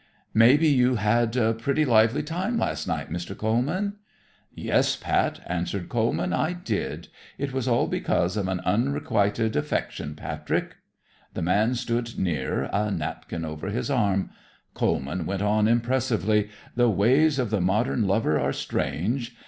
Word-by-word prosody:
"May 115 +5 +6
be 160 +1 +3
you 130 -3 +4
had 115 +2 +1
a 115 -3 +2
pretty 140 +7 0
lively 115 +3 +4
time 185 +9 -2
last - - -2
night, - - -3
Mr. 90 +3 -5
Coleman?" 145 - 0 0.5
"Yes, - - +1
Pat," - - 0
answered 85 +1 -3
Coleman. 115 -1 0
"I 160 +3 +1
did. 150 - -4 0.3
It 140 -1 -3
was 130 -2 -2
all 120 -1 +3
because 90 +4 0
of 100 -3 -1
an 95 -1 -2
unrequitted 110 -2 +1
affection, 75 0 -2
Patrick." - - -3 0.6
The - - -2
man 105 +8 +2
stood 120 -1 -2
near, 70 -6 -1
a 105 +1 +1
napkin 80 -2 -4
over 75 +3 -6
his 115 +7 -2
arm. 100 -7 +1 0.4
Coleman 80 +2 -1
went 100 +1 -2
on 105 +1 +3
impressively. 115 -3 +1 0.3
"The 120 0 +4
ways 135 +9 +3
of 125 -5 -1
the 105 -4 +1
modern 105 +4 +1
lover 95 -6 +2
are 70 +1 0
strange. 115 - -2
110 Hz, 150 wpm, -25 LUFS, 95-125 Hz, 0.6 s, May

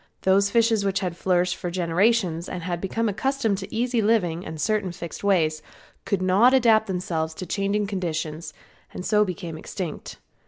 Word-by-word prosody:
Those 195 +1 +4
fishes 225 -1 +3
which 195 0 0
had 180 -3 -2
flourished 180 0 +1
for 175 - -5
generations 175 0 +1
had 175 -1 -4
become 225 +4 -1
accustomed 225 -1 0
to 195 0 -8
easy 240 +1 0
living 185 -6 +1
and 160 -3 -7
certain 205 +2 0
fixed 170 +2 -8
ways, 160 -6 +2 0.4
could 190 -2 0
not 205 +8 +5
adapt 225 -4 +4
themselves 165 -4 -2
to 185 - -6
changing 200 +2 0
conditions, 165 -5 -3 0.4
and 180 - -6
so 210 -1 +4
became 175 -4 -5
extinct. 180 -6 -6
190 Hz, 160 wpm, -24 LUFS, 175-210 Hz, 0.4 s, not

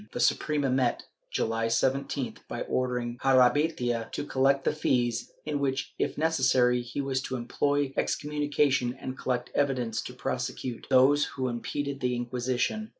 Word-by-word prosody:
The - - -4
Suprema 145 +2 +2
met 130 -2 +2
this, - - -22 0.2
July 115 0 0
17th, 130 +2 0
by - - -5
ordering 125 -1 -2
Jarabeytia 125 -3 +3
to - - -3
collect 135 0 +2
the - - +1
fees, 120 -5 0
in 150 -1 -1
which 135 -1 -1
if - - -1
necessary 130 -6 +3
he 120 +3 -6
was 135 -1 -1
to 130 - -4
employ 140 +3 0
excommunication 145 -4 +1
and 130 - -6
collect 125 -2 -2
evidence 130 -5 0
to - - -8
prosecute 125 -3 -4
those 140 +3 +5
who 130 -2 -3
impeded 140 +4 -3
the 125 -1 0
Inquisition. 125 - -1
130 Hz, 150 wpm, -28 LUFS, 120-140 Hz, 0.2 s, those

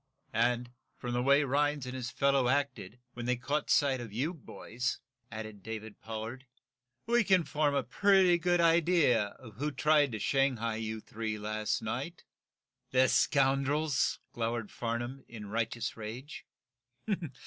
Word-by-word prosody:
"And, 120 +1 +1 0.3
from 120 -1 -4
the 120 - +1
way 140 +3 +5
Rhinds 145 0 +1
and 125 - -5
his 125 -2 -4
fellow 140 -1 +2
acted, 130 -6 -1 0.2
when 120 0 -5
they 125 - +2
caught 140 +5 -2
sight 135 -3 +3
of 115 -3 -8
you 135 - -1
boys," 125 -5 -4 0.3
added 110 -2 -7
David 110 0 -7
Pollard, 115 +4 -6 0.6
"we 235 +1 +3
can 190 -3 +4
form 150 -2 0
a 140 - +1
pretty 185 - +4
good 175 0 +2
idea 165 -8 +4
of 110 -5 -13
who 145 +4 -1
tried 145 +1 +3
to - - -2
shanghai 115 -2 +1
you 110 0 -4
three 110 -1 -4
last 110 +1 -2
night." - - -4 0.7
"The 130 0 +4
scoundrels!" 140 +1 +2 0.2
glowered 115 -2 -2
Farnum, 120 +3 -4
in 105 -3 -9
righteous 115 +2 -2
rage. 115 +8 -8
125 Hz, 145 wpm, -31 LUFS, 115-145 Hz, 0.7 s, way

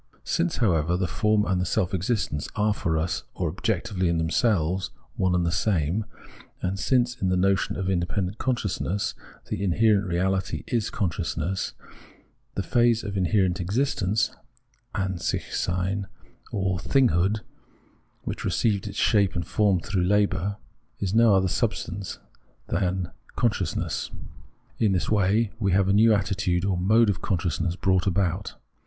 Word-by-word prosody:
Since, 170 -1 0
however, 90 - +2
the 95 - 0
form 105 +5 +1
and 90 -1 +1
the - - 0
self 95 -3 0
existence 95 -5 -1
are 105 0 +2
for 80 -6 -1
us, 80 +1 -1
or - - -1
objectively 95 -6 -1
in 85 - +1
themselves, 90 +1 +1 0.3
one 95 -1 +1
and 90 -1 +1
the 85 - +1
same, 90 +1 0 0.5
and 95 +1 -2
since 120 +2 +1
in 95 - +1
the 90 - +2
notion 95 +1 +2
of 95 - -3
independent 95 +2 -1
consciousness 105 -5 -1 0.4
the 95 - -2
inherent 100 +1 +3
reality 95 +2 -1
is 115 -4 -1
consciousness, 95 0 -2 0.8
the - - -1
phase 120 -1 +3
of 100 -2 -4
inherent 95 -1 +2
existence 105 0 0 0.6
{An 95 -3 -1
sichsein) 95 +4 -1 0.4
or 95 -3 -1
thinghood, 105 -2 +2 0.8
which - - -4
received 105 -4 +1
its - - -7
shape 100 -4 +3
and 85 -2 -2
form 100 0 +2
through 95 -1 -1
labour, 100 0 +1 0.4
is 95 -1 -1
no 115 -2 +6
other 95 0 +3
substance 95 +2 -2 0.5
than 90 -1 -1 0.2
con 120 - +3
sciousness. 90 -5 -3 0.7
In 105 -4 +3
this 90 - -1
way, 105 +1 +2
we 100 -4 +1
have 95 0 +3
a 100 - +3
new 110 +3 +6
attitude 95 -3 +1
or 100 -2 +1
mode 105 +5 +4
of 85 - -6
consciousness 85 -1 -1
brought 95 0 +1
about. 95 0 0
95 Hz, 145 wpm, -26 LUFS, 90-105 Hz, 0.8 s, no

